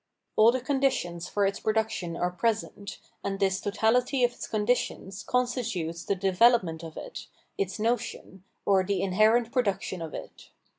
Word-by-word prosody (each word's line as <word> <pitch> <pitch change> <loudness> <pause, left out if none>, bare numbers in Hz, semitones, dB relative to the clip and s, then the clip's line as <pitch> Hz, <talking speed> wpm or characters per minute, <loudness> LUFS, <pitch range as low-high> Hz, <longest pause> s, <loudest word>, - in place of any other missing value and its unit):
All 220 +2 +7
the 255 - -1
conditions 255 -11 0
for 205 -1 +1
its 200 +2 -1
production 215 -6 -1
are 180 0 0
present, 205 0 -2 0.3
and 195 0 -2
this 190 -1 +1
totality 245 +6 +2
of 245 - +4
its - - -8
conditions 210 -3 -1
constitutes 230 -11 -1
the 200 - +1
de 190 +1 0
velopment 185 -5 +4
of 160 -1 -9
it, - - -8 0.3
its 195 -1 -2
notion, 220 -4 -2 0.2
or 195 -2 +4
the 190 -1 -1
inherent 215 +5 +3
produc 205 -7 +1
tion 185 - -5
of 160 -2 -6
it. - - -10
205 Hz, 160 wpm, -28 LUFS, 185-235 Hz, 0.3 s, All